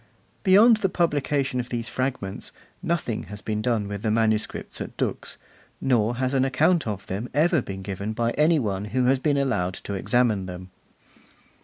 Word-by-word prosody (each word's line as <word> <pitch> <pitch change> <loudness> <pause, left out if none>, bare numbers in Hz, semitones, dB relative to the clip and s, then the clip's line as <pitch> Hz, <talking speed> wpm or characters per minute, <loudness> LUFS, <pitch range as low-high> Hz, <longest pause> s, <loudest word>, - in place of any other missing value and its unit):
Beyond 215 +4 +6
the 195 -3 0
publication 145 -6 0
of 125 0 -4
these 120 -1 -3
fragments, 125 -5 -3 0.3
nothing 160 -10 -2
has 105 0 -9
been 105 -1 -2
done 110 -3 0
with 100 -1 -5
the 110 - 0
manuscripts 110 -1 0
at - - -7
Dux, - - -2 0.4
nor 120 -3 +2
has 130 +2 -1
an 135 -1 +3
account 135 +4 +2
of 100 -3 -4
them 105 +6 -4
ever 160 +1 +3
been 95 -3 -7
given 100 +2 -4
by 115 +1 0
any 155 +5 +3
one 100 -6 -1
who 125 +4 0
has 130 +1 +3
been 145 +1 +1
allowed 105 -10 0
to 100 - -6
examine 105 -1 +1
them. 90 0 -8
120 Hz, 175 wpm, -25 LUFS, 105-140 Hz, 0.4 s, Beyond